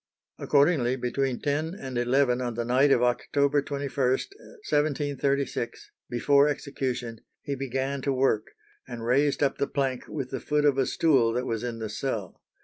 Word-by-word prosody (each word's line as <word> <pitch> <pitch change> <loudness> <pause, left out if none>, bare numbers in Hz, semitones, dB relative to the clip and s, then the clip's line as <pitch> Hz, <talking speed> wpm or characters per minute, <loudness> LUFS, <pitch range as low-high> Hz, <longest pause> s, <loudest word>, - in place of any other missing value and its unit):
Accordingly, 140 -4 +3
between 130 +1 -1
ten 155 +4 -1
and 130 -9 -7
eleven 125 +1 +2
on 120 -2 -3
the 120 0 -2
night 130 +4 +3
of 125 - +4
October 140 +4 +2
21, 140 -1 -5
1736, 145 - -1 0.2
before 140 +4 +4
execution, 130 -5 -3 0.2
he 140 - -3
began 135 +1 -2
to 140 - 0
work, 130 -5 +1 0.4
and 115 -2 -6
raised 140 +4 +2
up 140 - 0
the 140 - +1
plank 135 -3 -2
with 135 -4 -5
the 135 - -3
foot 150 0 0
of 140 -2 +3
a 135 - +2
stool 130 -8 +3
that 125 +2 -1
was 115 -2 -2
in 120 -2 -3
the 110 -1 -4
cell. 105 -3 -4
135 Hz, 160 wpm, -27 LUFS, 125-140 Hz, 0.4 s, of